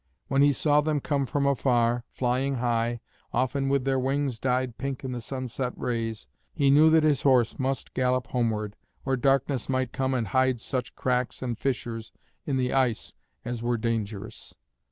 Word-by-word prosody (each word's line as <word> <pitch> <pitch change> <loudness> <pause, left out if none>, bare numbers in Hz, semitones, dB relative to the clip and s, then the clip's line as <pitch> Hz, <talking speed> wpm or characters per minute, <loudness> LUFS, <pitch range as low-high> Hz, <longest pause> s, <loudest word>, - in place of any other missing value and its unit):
When 135 -1 +3
he 145 0 +6
saw 145 +2 +3
them 150 0 0
come 140 -1 -1
from 140 +1 0
afar, 120 -3 +2
flying 130 +2 0
high, 120 -1 0 0.3
often 130 +2 0
with 135 -1 +1
their 135 -1 +2
wings 135 -2 -1
dyed 125 -1 -1
pink 135 0 -4
in 130 - -3
the 125 -1 -4
sunset 130 0 -3
rays, 115 - -3 0.2
he 140 -1 +2
knew 150 +3 +7
that 160 0 +5
his 150 -3 +3
horse 130 -3 +3
must 135 0 -2
gallop 130 -1 +1
homeward, 110 -5 -1 0.3
or 135 0 +1
darkness 135 0 +1
might 130 -2 0
come 130 -1 0
and 115 -5 -1
hide 130 +1 +2
such 125 +1 -4
cracks 125 -1 -1
and 120 -2 -2
fissures 115 -3 -3 0.4
in 140 -2 0
the 125 -1 0
ice 130 -4 0 0.3
as 120 -1 -3
were 120 0 0
dangerous. 110 -1 -4
130 Hz, 175 wpm, -27 LUFS, 120-135 Hz, 0.4 s, knew